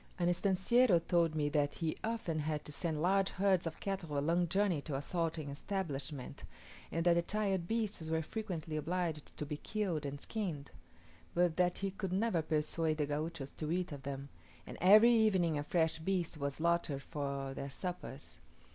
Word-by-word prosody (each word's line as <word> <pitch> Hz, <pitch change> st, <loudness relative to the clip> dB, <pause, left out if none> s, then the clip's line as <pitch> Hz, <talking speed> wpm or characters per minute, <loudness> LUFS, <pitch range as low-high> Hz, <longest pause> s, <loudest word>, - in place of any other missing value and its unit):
An 175 Hz, -2 st, +1 dB
"estanciero" 195 Hz, +3 st, +4 dB
told 170 Hz, -3 st, +3 dB
me 150 Hz, -1 st, +1 dB
that 145 Hz, -1 st, +1 dB
he 160 Hz, -2 st, -1 dB
often 220 Hz, -8 st, -1 dB
had 150 Hz, 0 st, -2 dB
to -, -, -7 dB
send 155 Hz, 0 st, -2 dB
large 195 Hz, +1 st, +3 dB
herds 190 Hz, -3 st, +2 dB
of 160 Hz, -, -6 dB
cattle 185 Hz, -7 st, -3 dB
a -, -, +3 dB
long 170 Hz, +4 st, +2 dB
journey 190 Hz, -3 st, +1 dB
to 145 Hz, -1 st, -4 dB
a -, -, 0 dB
salting 165 Hz, -3 st, -1 dB
establishment, 145 Hz, -5 st, -4 dB, 0.5 s
and 165 Hz, +1 st, -1 dB
that 175 Hz, -, +6 dB
the 170 Hz, -, +3 dB
tired 195 Hz, -2 st, -1 dB
beasts 215 Hz, -7 st, -1 dB
were 160 Hz, 0 st, +1 dB
frequently 170 Hz, -6 st, -4 dB
obliged 165 Hz, -1 st, -2 dB
to 150 Hz, -, -3 dB
be 145 Hz, 0 st, -4 dB
killed 190 Hz, -5 st, -2 dB
and 140 Hz, 0 st, -4 dB
skinned; 165 Hz, -8 st, -4 dB, 0.6 s
but 175 Hz, -2 st, +3 dB
that 180 Hz, -1 st, +2 dB
he 195 Hz, 0 st, -2 dB
could 190 Hz, -1 st, -4 dB
never 195 Hz, -3 st, +2 dB
persuade 155 Hz, +1 st, +2 dB
the 150 Hz, -, +1 dB
Gauchos 150 Hz, -1 st, -3 dB
to 155 Hz, 0 st, -4 dB
eat 180 Hz, 0 st, -1 dB
of 145 Hz, -2 st, -6 dB
them, 140 Hz, 0 st, -5 dB, 0.4 s
and -, -, -8 dB
every 215 Hz, +6 st, +8 dB
evening 190 Hz, -8 st, +3 dB
a -, -, -2 dB
fresh 160 Hz, 0 st, +1 dB
beast 175 Hz, 0 st, -1 dB
was 140 Hz, -2 st, -2 dB
slaughtered 165 Hz, -4 st, 0 dB
for 140 Hz, -3 st, -3 dB
their 140 Hz, +1 st, -5 dB
suppers! 150 Hz, -3 st, -6 dB
165 Hz, 180 wpm, -34 LUFS, 150-190 Hz, 0.6 s, every